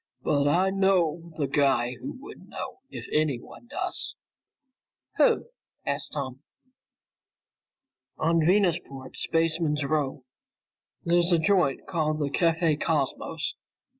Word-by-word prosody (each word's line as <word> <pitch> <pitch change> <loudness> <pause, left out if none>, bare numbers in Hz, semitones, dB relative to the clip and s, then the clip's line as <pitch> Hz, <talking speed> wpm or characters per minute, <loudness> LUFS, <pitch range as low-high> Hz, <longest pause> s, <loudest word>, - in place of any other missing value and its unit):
"But 145 -1 +2
I 185 +6 +3
do 195 - -4
know 170 -4 +2
the 150 - +1
guy 135 -4 +2
who 125 - -7
would - - -12
know - - -6
if - - -7
anyone 150 - -1
does." 285 - -3 1.0
"Who?" - - +3 0.4
asked - - -2
Tom. 135 -3 -4 1.8
"On 165 +1 +2
Venusport's 170 -8 +1
Spaceman's 160 -2 +1
Row. 140 -3 -1 0.8
There's 175 +1 +3
a 170 - +6
joint 175 -5 +2
called 155 -3 0
the 145 -2 -1
Café 165 -2 +2
Cosmos. 150 -5 -1
155 Hz, 110 wpm, -27 LUFS, 140-170 Hz, 1.8 s, a